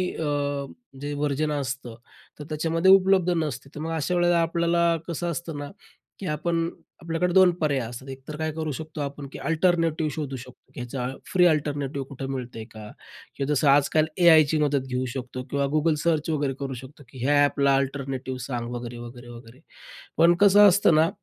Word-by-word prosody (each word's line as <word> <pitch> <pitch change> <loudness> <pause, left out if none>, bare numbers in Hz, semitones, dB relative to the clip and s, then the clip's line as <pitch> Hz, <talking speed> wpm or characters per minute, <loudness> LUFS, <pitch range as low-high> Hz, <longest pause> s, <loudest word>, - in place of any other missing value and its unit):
अ, 145 -2 -2 0.4
जे 145 0 -4
व्हर्जन 145 +1 -1
असतं 135 -4 -4 0.4
तर - - -6
त्याच्यामध्ये 165 +4 +2
उपलब्ध 190 -2 +5
नसते. 135 -2 -5
तर - - -6
मग 160 +2 -4
अशा 160 +3 -1
वेळेला 175 -1 +3
आपल्याला 170 0 +2
कसं 175 0 -3
असतं 165 -1 -5
ना, 145 0 -6 0.5
की 195 - -6
आपण 165 +2 -1 0.3
आपल्याकडे 165 +2 -1
2 190 -1 +6
पर्याय 145 -3 +1
असतात. 120 +3 -9
एक 135 0 -7
तर 155 - -6
काय 160 0 -2
करू 155 -1 -3
शकतो 155 +2 -6
आपण, 140 0 -5
की - - -8
अल्टरनेटिव्ह 165 -2 +1
शोधू 140 -4 -4
शकतो, 125 0 -13
की - - -9
ह्याचा 125 +1 -4 0.2
फ्री 180 -2 +4
अल्टरनेटिव्ह 145 -4 0
कुठं 135 0 -6
मिळतंय 125 -4 -6
का? 110 -1 -10 0.5
की 140 - -2
जसं 145 0 +1
आजकाल 145 +2 +4
एआयची 160 -4 +6
मदत 145 -3 +1
घेऊ 130 0 -2
शकतो 130 -1 -6
किंवा 140 +1 0
Google 155 +1 +2
सर्च 165 -2 +1
वगैरे 145 -3 0
करू 135 -1 -4
शकतो, 130 +4 -11
की 130 -3 -8
ह्या 145 +1 +4
ॲपला 140 -1 +2
अल्टरनेटिव्ह 135 -1 -3
सांग 120 -2 -4
वगैरे-वगैरे-वगैरे. 120 0 -9 0.6
पण 170 +2 +5
कसं 205 +1 +8
असतं 185 -4 +4
ना 160 +2 +4
145 Hz, 175 wpm, -25 LUFS, 135-165 Hz, 0.6 s, कसं